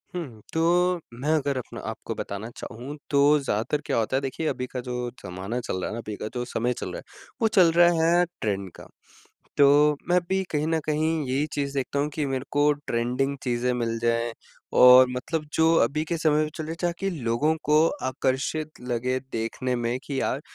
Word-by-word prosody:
हुँ, 135 -11 -6
तो 175 +2 +2
मैं 130 +6 -4
अगर 140 -2 -1
अपना 125 - -6
आपको - - -5
बताना 100 +3 -5
चाहूँ 130 +7 -7
तो 140 - +3 0.2
ज़्यादातर 135 +2 -1
क्या 140 - 0
होता 115 +3 0
है - - 0
देखिए 140 +4 -3
अभी 125 -3 -2
का 125 - -5
जो 125 0 -3 0.2
ज़माना 95 +7 -4
चल 120 -6 -3
रहा - - -2
है - - -5
ना, 115 - -4
अभी 110 -2 -6
का - - -2
जो 125 -1 -3
समय 125 0 -1
चल - - -4
रहा - - -4
है - - -9 0.4
वो 225 - +5
चल 185 -6 +5
रहा 175 +1 +6 0.3
है 175 - +4 0.2
ट्रेंड 100 -3 -2
का। - - -12 0.7
तो 145 +1 +5
मैं 180 +1 +4
भी 190 0 +1
कहीं 150 0 0
न 165 0 +1
कहीं 155 +1 0
यही 135 +4 0
चीज़ 140 -1 -2
देखता 140 +1 -2
हूँ 145 +1 +1
कि 155 - -1
मेरे 135 -1 -2
को 145 +1 +3
ट्रेंडिंग 125 +4 0
चीज़ें 125 0 0
मिल 115 -1 -1
जाएँ 115 0 +1 0.4
और 125 +1 +9
मतलब 130 +5 -3
जो 160 +1 +4
अभी 145 +6 +1
के 170 +1 -2
समय 155 -1 +3
में 155 - -1
चल 160 - -5
रहे 160 - -4
ताकि 175 +3 -1
लोगों 145 0 0
को 150 +1 +3 0.3
आकर्षित 135 +4 -2
लगे 125 +1 -1
देखने 115 +3 -2
में 120 +1 -1
कि 140 -2 -3
यार 135 - -1
135 Hz, 205 wpm, -25 LUFS, 120-155 Hz, 0.7 s, और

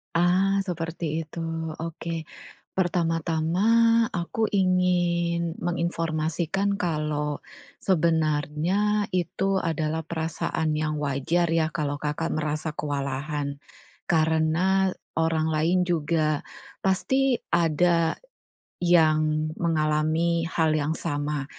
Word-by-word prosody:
Ah, 185 +3 +3
seperti 165 -2 -3
itu 160 +2 -9 0.4
oke, 165 0 -5 0.5
pertama-tama 165 -1 0 0.5
aku 175 +5 -3
ingin 175 -3 +1
menginformasikan 170 +2 -1
kalau, 150 -4 -1 0.4
sebenarnya 170 +4 +1
itu 190 +2 0
adalah 160 -2 -1
perasaan 160 -1 -2
yang 155 0 -1
wajar 150 +5 0
ya 165 -1 +2
kalau 145 -3 -2
Kakak 150 +2 -1
merasa 155 0 -2
kewalahan, 140 0 -3 0.5
karena 165 +4 +2 0.2
orang 160 -1 +1
lain 165 +4 +2
juga, 155 -2 +1 0.4
pasti 255 +7 +2
ada, 170 0 +3 0.7
yang 155 -3 +3
mengalami 160 +1 +1
hal 160 -1 +1
yang 150 +1 0
sama, 145 -2 -2
165 Hz, 85 wpm, -26 LUFS, 155-175 Hz, 0.7 s, Ah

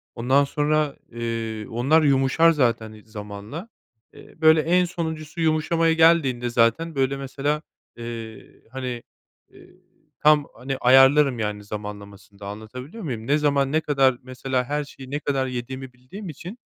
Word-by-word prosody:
Ondan 130 +4 +3
sonra, 150 +1 0 0.2
eee, 115 -2 -4
onlar 135 +8 +3
yumuşar 140 +4 +4
zaten, 120 -7 0
ııı, 110 -1 -14
zamanla. 105 - -8 0.4
Eee, - - -16
böyle, 160 0 +6
en 180 +3 +3
sonuncusu 160 -2 -5
yumuşamaya 165 +1 +2
geldiğinde 160 -7 +3
zaten, 120 +8 +1
böyle, 135 0 0
mesela, 140 +2 -2 0.4
eee, 115 -2 -9
hani, 125 -2 -5 0.5
eee, - - -17 0.5
tam, 150 -1 +5
hani, 135 +1 -4
ayarlarım, 135 +1 +5
yani, 105 -1 -3
zamanlamasını 100 -1 -9
da 100 - -8
anlatabiliyor 125 - -8
muyum? 120 -7 -5
Ne 145 - +3
zaman, 140 -2 +1
ne 155 +1 +2
kadar, 135 -4 +2
mesela, 130 0 -2
her 150 +3 -2
şeyi 135 -2 -12
ne 145 - -1
kadar 135 -3 -1
yediğimi 130 +1 -6
bildiğim 130 +11 -10
için, 175 - -9
135 Hz, 145 wpm, -23 LUFS, 115-150 Hz, 0.5 s, böyle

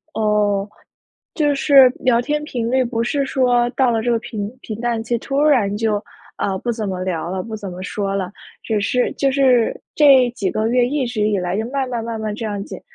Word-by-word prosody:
哦， 210 -2 +1 0.7
就 295 -3 +1
是 275 -2 +6
聊 240 -2 +3
天 300 +3 -2
频 240 -6 -3
率 260 0 +2
不 230 -1 -2
是 275 +3 0
说 245 -3 +2
到 260 -1 +2
了 225 -1 0
这 245 - 0
个 230 - +2
平 215 -3 -5
平 220 -3 -7
淡 235 -2 -1
期 235 +1 -1
突 275 +4 -2
然 240 -10 +3
就， 220 0 0 0.4
呃， 195 -1 -1
不 240 - -3
怎 220 -2 -3
么 185 -1 -3
聊 175 -2 -3
了， 185 -1 -3
不 220 -1 -6
怎 200 -3 -7
么 180 +1 -8
说 195 0 -3
了。 185 -2 -2 0.3
只 220 -2 -1
是 245 +4 0
就 275 -1 +1
是 260 -4 +3 0.2
这 270 -5 +6
几 195 -3 -1
个 220 +1 -1
月 245 0 +3
一 270 -1 -1
直 215 -3 -1
以 210 -2 +1
来 180 +1 -2
就 220 - -1
慢 270 -2 -1
慢 235 -2 -3
慢 230 -1 -4
慢 215 -1 -3
这 225 - -6
样 205 -2 -3
减 - - -8
230 Hz, 240 characters per minute, -20 LUFS, 210-255 Hz, 0.7 s, 是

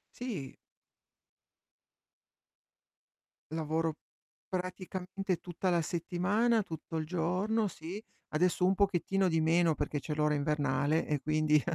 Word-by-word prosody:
Sì. 205 - -5 3.0
Lavoro 160 0 0 0.5
praticamente 185 0 -3
tutta 180 +1 -2
la 170 -1 +3
settimana, 190 +8 +1
tutto 160 -2 -7
il 155 - -1
giorno, 185 +6 +1
sì. 180 +3 -6 0.3
Adesso 180 +3 +3
un 190 +1 +4
pochettino 195 -1 +2
di 165 -2 +2
meno 165 0 +4
perché 145 0 -1
c'è 150 +3 -4
l'ora 150 0 +2
invernale 145 +1 +1
e 150 -1 0
quindi, 155 +1 +3
170 Hz, 105 wpm, -32 LUFS, 155-185 Hz, 3.0 s, un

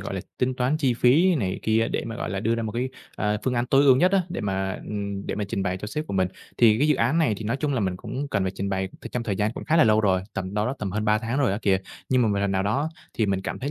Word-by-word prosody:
gọi - - -5
là, - - -2 0.2
tính 130 0 +1
toán 130 +4 +1
chi 135 -6 +1
phí 155 +10 +4
này 95 -10 -1
kia 110 +1 +2
để - - -2
mà, 115 -1 -5
gọi - - -4
là, 95 0 -2
đưa 115 +1 +1
ra 115 - -2
một 110 - -3
cái, 125 +2 -1 0.3
ờ, 105 0 0
phương 130 -1 0
án 120 +1 0
tối 135 +2 +4
ưu 130 -2 +7
nhất 180 +8 +3
á, 195 - +4
để 170 - -4
mà, 95 -1 -2
ừm, 100 -1 -4
để - - -2
mà 105 - -2
trình 100 - -2
bày 90 -1 -1
cho 105 - -6
sếp 150 +8 -4
của - - -6
mình. 95 -1 +2 0.3
Thì 110 -2 +5
cái 150 - +3
dự 150 - +5
án 130 +9 +2
này 120 -10 +2
thì 110 - -7
nói 115 +5 0
chung 145 0 -1
là 125 - 0
mình 95 -3 -1
cũng 140 +9 -5
cần 100 -6 0
phải 95 - -2
trình 100 0 -3
bày, 95 -1 -1
ừm, - - -7
trong 125 - -2
thời 105 -4 -2
gian 105 +3 0
cũng - - -7
khá 160 - +2
là 160 - +6
lâu 110 0 +4
rồi, 95 -3 +2
tầm 95 0 -4
đâu 105 +1 +1
đó 130 - -1
tầm 100 -3 -3
hơn 105 0 -1
3 105 0 +3
tháng 115 +4 -2
rồi 135 -8 +2
á 100 - -1
kìa, 95 -2 +3 0.3
nhưng 130 -1 +3
mà 115 - +3
một 100 -1 0
lần 100 0 0
nào 95 0 +1
đó 135 +10 0 0.3
thì 110 - +1
mình 95 -1 0
cảm 100 - -4
thấy 140 +3 -3
110 Hz, 340 wpm, -25 LUFS, 100-130 Hz, 0.3 s, ưu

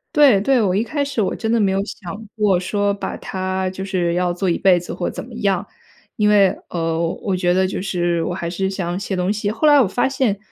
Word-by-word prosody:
对， 275 -10 +6
对， 260 +4 +3
我 190 -5 +1
一 210 - +2
开 285 +3 -2
始 275 -5 -2
我 195 - -1
真 225 -1 -2
的 235 - +3
没 200 -3 +2
有 190 - 0
想 205 +2 -8
过 205 -5 +2
说 205 +2 0
把 200 - -5
它 185 0 -3
就 190 +1 -6
是 180 -3 0
要 180 0 +1
做 185 +1 -1
一 170 - +1
辈 185 -2 +4
子 175 - -8
或 - - -3
怎 - - -6
么 245 - -13
样。 200 -4 0 0.5
因 210 - +2
为， 205 -2 +5 0.2
呃， 165 -1 -1 0.2
我 195 -3 -1
觉 175 -1 +2
得 190 +1 +2
就 185 - -4
是 175 -3 0
我 180 - -2
还 170 -2 -4
是 190 +2 -2
想 180 -2 -3
写 200 -1 -3
东 180 +1 0
西。 210 -1 -1
后 230 +8 +1
来 290 -1 +7
我 250 - +4
发 245 +7 0
现， 260 -7 0
195 Hz, 270 characters per minute, -20 LUFS, 180-215 Hz, 0.5 s, 来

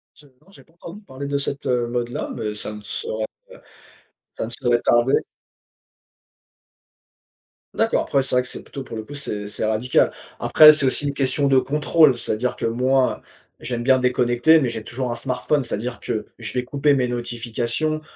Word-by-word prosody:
Je 150 - -18
non, 130 +7 -26
j'ai 200 - -16
pas 165 - -29
entendu 170 +3 -10
parler 140 -7 -8
de 140 0 -1
cette, 140 0 -4
heu, 125 -2 +1
mode-là, 120 0 -3
mais 105 -3 -3
ça 105 0 -7
ne 105 0 -9
saurait, 110 +1 -4
heu, - - -2 1.1
ça - - -3
ne - - -8
saurait 120 -1 +1
tarder. 120 +3 +3 2.6
D'accord. - - +1
Après, 140 - +1
c'est 130 - -4
vrai 125 - +4
que 125 - -8
c'est - - -7
plutôt, 135 - -8
pour 115 - -8
le - - -4
coup, 145 - -10
c'est 105 -8 -5
c'est 105 - -4
radical. 110 +3 +2 0.3
Après, 155 -1 +8
c'est 150 -2 -1
aussi 135 +2 0
une 140 - -3
question 140 +1 +1
de 135 -1 +5
contrôle, 150 0 +3
c'est-à-dire 120 +2 -2
que - - -2
moi, 130 +3 +1 0.4
j'aime 120 -2 -4
bien 130 +1 +4
déconnecter, 125 +5 +3
mais 130 - 0
j'ai 115 -2 -5
toujours 125 +2 -4
un 120 - -3
smartphone, 130 +2 -1
c'est-à-dire 120 +1 -4
que 110 - -4
je 110 -1 -6
vais 125 -1 -1
couper 140 +3 +1
mes 130 -3 +1
notifications, 120 +5 -3
125 Hz, 190 wpm, -22 LUFS, 120-140 Hz, 2.6 s, Après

